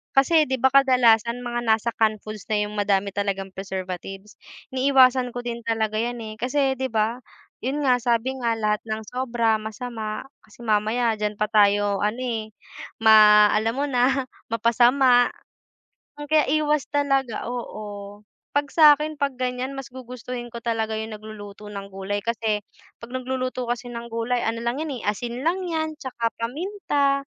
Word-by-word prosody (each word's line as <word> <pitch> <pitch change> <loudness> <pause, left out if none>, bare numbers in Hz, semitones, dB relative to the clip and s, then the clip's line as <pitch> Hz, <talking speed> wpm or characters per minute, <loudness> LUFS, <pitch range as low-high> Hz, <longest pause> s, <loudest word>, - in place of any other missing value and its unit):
kasi 305 +3 +4
'di 260 - 0
ba, 265 +2 +3
kadalasan 245 -3 +4
mga 240 0 -2
nasa 220 +1 +2
can 220 -1 +3
foods 215 -2 -8
na 210 -1 +1
yung - - -9
madami 200 -1 +1
talagang 195 -1 -2
preservatives, 190 +1 -7 0.3
iniiwasan 260 -2 +4
ko 245 - -4
din 235 -1 -4
talaga 220 -1 0
yan 240 +1 -2
eh. 215 -1 -7
Kasi 270 +3 +1
'di 265 - 0
ba, 225 +2 0 0.4
yun 280 +4 -1
nga 250 -2 +3
sabi 240 +2 +1
nga 235 -2 0
lahat 210 -1 0
ng 220 0 -3
sobra 235 -3 +1
masama, 220 -1 -5 0.2
kasi 220 +2 -16
mamaya 220 +2 +2
diyan 210 0 -1
pa 215 - +1
tayo 205 -1 +3
ano 210 +3 0
eh, 230 -4 -3 0.6
ma 210 -1 +8
alam 225 +2 +1
mo 280 +2 0
na 260 +2 +2 0.3
mapasama. 245 +2 +4 0.9
Kaya 295 +1 +2
iwas 300 -1 +1
talaga 275 -4 0
oo, 210 -4 -7 0.3
'pag 285 0 0
sa'kin, 300 -1 +5
'pag 280 -2 0
ganyan 255 +1 -3
mas 270 -3 -8
gugustuhin 250 -1 -7
ko 235 - -6
talaga 225 -2 -1
yung 220 0 -5
nagluluto 210 -1 -10
ng 200 -1 -7
gulay 195 +1 -4
kasi, 220 -2 -1 0.4
'pag 230 - -9
nagluluto 255 -1 -3
kasi 240 0 -3
ng 235 0 -6
gulay, 235 +2 -1
ano 230 +1 -1
lang 240 +4 -1
yan, 300 -4 -4
eh, - - -10
asin 240 +3 -5
lang 350 +3 +2
'yan, 315 -2 -2
'tsaka 235 -5 -2
paminta, 280 - -1
235 Hz, 160 wpm, -24 LUFS, 215-260 Hz, 0.9 s, ma